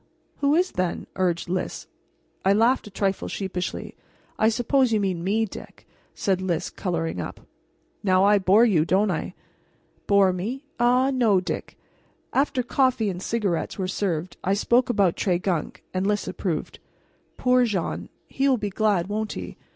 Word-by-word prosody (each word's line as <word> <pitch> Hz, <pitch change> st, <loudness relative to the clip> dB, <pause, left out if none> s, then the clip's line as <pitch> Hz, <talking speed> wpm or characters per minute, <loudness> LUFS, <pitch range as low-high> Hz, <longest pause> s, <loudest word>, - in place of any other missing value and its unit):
"Who 285 Hz, +1 st, +2 dB
is, 360 Hz, +2 st, +2 dB
then?" 180 Hz, -2 st, -2 dB
urged 180 Hz, -3 st, 0 dB
Lys. 185 Hz, +2 st, -3 dB, 0.6 s
I 195 Hz, -, +4 dB
laughed 230 Hz, +3 st, +3 dB
a -, -, -8 dB
trifle 195 Hz, -1 st, -1 dB
sheepishly. 190 Hz, -2 st, -4 dB, 0.5 s
"I 220 Hz, -, +5 dB
suppose 245 Hz, +2 st, +2 dB
you 220 Hz, -, +3 dB
mean 185 Hz, -4 st, -1 dB
me, 215 Hz, +4 st, +1 dB
Dick," 205 Hz, -, -11 dB, 0.3 s
said 190 Hz, -2 st, 0 dB
Lys, 175 Hz, -4 st, -2 dB
coloring 165 Hz, -3 st, -2 dB
up. -, -, -7 dB, 0.6 s
"Now 185 Hz, -2 st, +3 dB
I 205 Hz, 0 st, +5 dB
bore 195 Hz, +5 st, +5 dB
you, 180 Hz, -9 st, +3 dB
don't 195 Hz, +4 st, +2 dB
I?" 160 Hz, -, -4 dB, 0.7 s
"Bore 195 Hz, -2 st, +4 dB
me? 235 Hz, +11 st, -4 dB
Ah, 250 Hz, +3 st, +3 dB
no, 230 Hz, -7 st, +3 dB
Dick." 180 Hz, -, -5 dB, 0.6 s
After 270 Hz, -1 st, +1 dB
coffee 250 Hz, -4 st, +1 dB
and 180 Hz, 0 st, -7 dB
cigarettes 200 Hz, -6 st, -1 dB
were 190 Hz, -2 st, -2 dB
served 180 Hz, -3 st, -2 dB
I 195 Hz, +2 st, +2 dB
spoke 240 Hz, +5 st, +2 dB
about 200 Hz, -7 st, +2 dB
Tregunc, 180 Hz, -3 st, -1 dB
and 185 Hz, +1 st, 0 dB
Lys 210 Hz, 0 st, 0 dB
approved. 175 Hz, -3 st, -3 dB, 0.6 s
"Poor 250 Hz, 0 st, +3 dB
Jean! 195 Hz, -7 st, -2 dB, 0.2 s
He 275 Hz, +1 st, 0 dB
will 260 Hz, -, +3 dB
be 205 Hz, -2 st, -3 dB
glad, 205 Hz, -4 st, +1 dB
won't 215 Hz, +2 st, -3 dB
he? 90 Hz, -1 st, -7 dB
200 Hz, 160 wpm, -24 LUFS, 185-235 Hz, 0.7 s, I